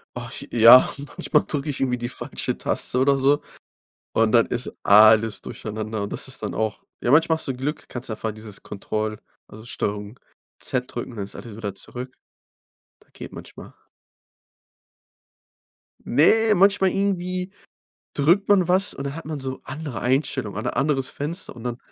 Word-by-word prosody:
Ach - - -6 0.2
ja, 120 +2 +8
manchmal 145 +1 0
drücke 150 0 -2
ich 140 - -7
irgendwie 125 -2 0
die 120 0 -4
falsche - - -3
Taste 125 - -2
oder 140 +1 +4
so 140 +2 +3 0.7
und 115 -1 +3
dann 115 0 +5
ist 120 0 -4
alles 110 +1 +6
durcheinander 110 0 -5
und 100 - -5
das - - -4
ist - - -8
dann - - -3
auch 110 -1 -2 0.2
ja, 120 - +1
manchmal 160 +2 +5
hast - - -6
du 135 - -1
Glück. 140 +5 -4
Kannst 120 -1 -6
einfach 110 0 -3
dieses 110 -1 -10
Control, 110 +1 -4 0.3
also 110 +1 -12
Steuerung 105 -2 -4 0.4
z 125 -1 -1
drücken, 120 0 -6
dann 100 - -3
ist - - -12
alles 115 -3 -9
wieder 100 -3 -5
zurück. 125 +5 -8 0.9
Da - - -28
geht - - -9
manchmal. - - -11 2.3
Ne, 215 - +4
manchmal 195 0 +4
irgendwie 185 -1 -1 0.6
drückt 175 +8 +2
man 190 -4 +5
was 190 +3 +1
und 140 - -6
dann 140 +1 -4
hat 165 - -8
man 155 -1 -4
so 130 -1 -5
andere 140 -6 -6
Einstellungen 130 -5 -1
oder - - -3
anderes 135 -2 +1
Fenster 155 +3 -5
und 115 - -11
dann 120 -1 -3
130 Hz, 165 wpm, -23 LUFS, 110-150 Hz, 2.3 s, ja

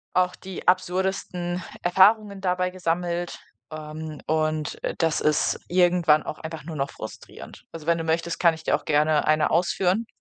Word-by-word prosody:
auch 180 0 +2
die 190 -1 -9
absurdesten 180 -1 0 0.2
Erfahrungen 200 +2 +4
dabei 180 -1 0
gesammelt, 175 -1 -2 0.3
ähm, 155 0 -7
und, 155 -1 -1
äh, - - -2
das 165 -2 +1
ist 150 0 +1
irgendwann 175 -4 +3
auch - - -6
einfach 160 0 -7
nur 160 +1 -7
noch 140 -1 -2
frustrierend. 110 - -10
Also 160 -2 -9
wenn 170 0 +2
du - - -2
möchtest, 165 +1 -1
kann 170 -2 +4
ich 160 - -13
dir - - +2
auch - - -6
gerne 150 0 +2
1 155 0 +3
ausführen? 185 +5 +1
170 Hz, 165 wpm, -25 LUFS, 155-180 Hz, 0.3 s, Erfahrungen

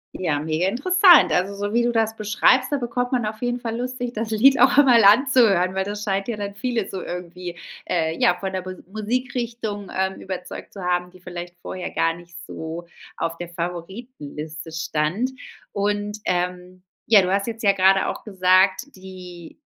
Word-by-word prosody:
Ja, 160 -6 -1
mega 160 +3 0
interessant. 345 - +5
Also, 185 +5 0
so 205 +1 -3
wie 240 +1 +3
du 240 0 +1
das 220 -1 0
beschreibst, 215 +5 +3
da 290 - 0
bekommt 245 0 -2
man 245 -3 +1
auf 215 +1 -5
jeden 245 0 -2
Fall 230 -1 -3
Lust, 255 +1 -4
sich 245 -1 -3
das 225 -1 -4
Lied 250 +5 +4
auch - - +5
einmal 250 -7 +6
anzuhören, 210 -5 +5
weil 190 0 -1
das 205 +1 -5
scheint 195 -1 -1
ja 235 - -2
dann 200 -1 -5
viele 230 -2 -2
so 190 - -5
irgendwie, 180 0 -7 0.3
äh, 160 -2 -1
ja, 180 - +4
von 190 +1 -4
der 190 0 -3
Mu 185 - -4 0.2
Musikrichtung, 230 -2 -3
ähm, 190 0 -1
überzeugt 185 -1 -7
zu 195 - -8
haben, 180 0 -1
die 185 0 -18
vielleicht 175 -1 -8
vorher 185 0 -6
gar 165 - +1
nicht 175 0 -14
so 165 +2 -7 0.3
auf 165 0 -3
der 175 - -6
Favoritenliste 170 - -7
stand. 165 +9 -1 0.4
Und, 205 +1 -2
ähm, 180 0 -3 0.2
ja, 215 -3 +7
du 185 0 -1
hast 200 +2 0
jetzt 230 0 -6
ja 200 - +6
grade 195 0 +3
auch - - -5
gesagt, 190 +4 +2
die 180 -3 -11
195 Hz, 185 wpm, -22 LUFS, 180-230 Hz, 0.4 s, ja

